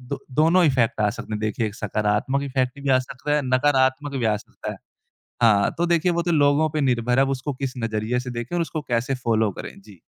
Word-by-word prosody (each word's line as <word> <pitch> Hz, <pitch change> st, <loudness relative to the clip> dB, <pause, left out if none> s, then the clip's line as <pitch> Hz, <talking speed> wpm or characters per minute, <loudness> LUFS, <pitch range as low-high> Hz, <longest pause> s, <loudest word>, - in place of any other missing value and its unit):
दो 130 Hz, +2 st, -6 dB, 0.2 s
दोनों 170 Hz, +3 st, +5 dB
इफेक्ट 130 Hz, -7 st, +2 dB
आ 105 Hz, -1 st, +3 dB
सकते 105 Hz, -, -8 dB
हैं, 105 Hz, -, -4 dB
देखिए 110 Hz, +1 st, -1 dB
एक 105 Hz, -, -6 dB
सकारात्मक 105 Hz, +6 st, -1 dB
इफ़ेक्ट 130 Hz, -1 st, -2 dB
भी 140 Hz, -, 0 dB
आ 130 Hz, -, +5 dB
सकता 130 Hz, +3 st, -3 dB
है, 150 Hz, -, +1 dB
नकारात्मक 130 Hz, +1 st, +1 dB
भी 125 Hz, -, -1 dB
आ 105 Hz, -1 st, +2 dB
सकता 105 Hz, -, -8 dB
है। -, -, -10 dB, 0.7 s
हाँ, 105 Hz, -4 st, +4 dB
तो 170 Hz, -, +1 dB
देखिए 170 Hz, +1 st, +2 dB
वो 170 Hz, 0 st, 0 dB
तो 175 Hz, -, 0 dB
लोगों 145 Hz, 0 st, +3 dB
पे 155 Hz, 0 st, -2 dB
निर्भर 125 Hz, -1 st, +1 dB
है 135 Hz, -, +5 dB
अब -, -, -3 dB
उसको 135 Hz, +2 st, -3 dB
किस 130 Hz, -1 st, -4 dB
नज़रिए 115 Hz, +1 st, -1 dB
से 125 Hz, 0 st, -6 dB
देखें 120 Hz, +7 st, -5 dB
और 175 Hz, -, +1 dB
उसको 160 Hz, -2 st, -3 dB
कैसे 125 Hz, +3 st, 0 dB
फॉलो 110 Hz, -2 st, +2 dB
करें। -, -, -8 dB
जी। 100 Hz, -3 st, -16 dB
130 Hz, 235 wpm, -23 LUFS, 115-145 Hz, 0.7 s, दोनों